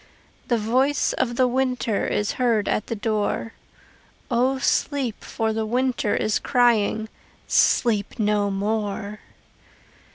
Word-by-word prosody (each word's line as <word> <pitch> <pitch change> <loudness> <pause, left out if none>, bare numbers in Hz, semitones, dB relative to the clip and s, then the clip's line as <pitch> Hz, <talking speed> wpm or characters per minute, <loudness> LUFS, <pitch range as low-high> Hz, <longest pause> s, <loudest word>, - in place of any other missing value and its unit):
The 240 - +2
voice 255 +6 +1
of 240 -2 -1
the 255 +1 +3
winter 250 -4 0
Is 210 0 0
heard 230 -4 +2
at 210 - -1
the 230 - -3
door. 215 +1 -2 0.8
O 255 +3 +2
sleep, 270 -3 -1
for 220 -1 -2
the 220 0 -1
winter 250 -2 0
Is 215 - 0
crying 225 -3 +2 0.4
"Sleep 215 -3 +2
no 210 -2 +1
more." 205 +1 -3
225 Hz, 120 wpm, -23 LUFS, 210-250 Hz, 0.8 s, the